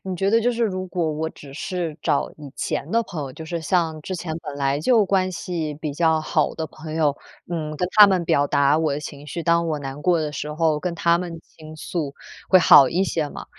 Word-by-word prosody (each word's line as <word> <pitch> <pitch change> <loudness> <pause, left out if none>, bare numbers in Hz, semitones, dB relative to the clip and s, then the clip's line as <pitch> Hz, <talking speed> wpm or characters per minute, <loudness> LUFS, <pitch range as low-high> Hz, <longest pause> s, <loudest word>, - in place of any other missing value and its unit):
你 185 -2 -4
觉 195 +3 +1
得 230 +1 +4
就 245 - +2
是 235 -1 -2
如 185 -3 -2
果 170 -4 -1
我 160 +1 -2
只 140 -3 -13
是 165 0 -4
找 140 - 0
以 145 -2 -10
前 150 - -3
的 230 +1 +2
朋 170 -8 -6
友， 135 - -6
就 160 - -8
是 170 +1 -4
像 160 -1 0
之 185 +4 -5
前 165 -2 -5
本 145 -3 -7
来 140 +1 0
就 225 +3 +4
关 185 -1 +1
系 165 -4 -4
比 150 -1 -5
较 160 0 +2
好 - - 0
的 160 -1 -4
朋 155 0 -9
友， 155 -3 +2 0.4
嗯， 155 -2 -3
跟 180 - 0
他 210 -1 +9
们 185 -3 +1
表 145 -2 +2
达 140 +1 +3
我 155 -3 0
的 145 - -4
情 145 -1 -9
绪， 165 +3 -5
当 170 0 +2
我 155 -2 -1
难 135 0 -7
过 175 +1 +2
的 150 - -3
时 150 0 -5
候， 155 -2 +1
跟 180 0 -3
他 170 0 +2
们 175 -2 -5 0.2
倾 155 0 -11
诉 155 -3 -4 0.3
会 185 - +7
好 140 -6 +8
一 185 +7 +1
些 155 -5 -1
嘛。 - - -9
160 Hz, 260 characters per minute, -22 LUFS, 150-180 Hz, 0.4 s, 他